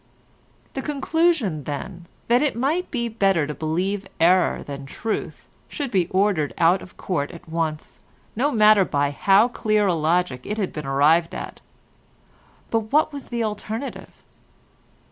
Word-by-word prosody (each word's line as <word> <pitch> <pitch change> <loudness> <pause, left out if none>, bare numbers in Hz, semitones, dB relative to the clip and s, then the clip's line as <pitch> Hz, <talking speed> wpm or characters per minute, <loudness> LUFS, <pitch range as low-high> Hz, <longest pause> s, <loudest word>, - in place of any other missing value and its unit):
The 270 - -3
conclusion, 290 - 0
then, 170 +4 -6 0.2
that 240 +2 +4
it 295 -5 +1
might 295 +9 0
be 235 -3 -2
better 195 -8 +1
to 150 - -4
believe 185 +6 -2
error 180 +2 +3
than 140 -1 -8
truth 220 +10 -4 0.2
should 280 -4 -4
be 185 -4 +2
ordered 185 -5 +1
out 175 +3 +4
of 185 - -13
court 145 -7 -2
at 170 -2 -12
once, 160 -2 -3 0.4
no 275 +7 +1
matter 215 -3 +6
by 145 -4 0
how 195 - +4
clear 215 -3 +1
a 185 - +2
logic 165 -4 0
it 210 - -4
had 200 -4 -2
been 150 -3 -6
arrived 155 +5 +3
at; - - -7 1.1
but 225 -1 -1
what 300 +1 +3
was 280 -2 -8
the 235 -1 -1
alternative? 220 +4 -5
195 Hz, 150 wpm, -23 LUFS, 160-230 Hz, 1.1 s, matter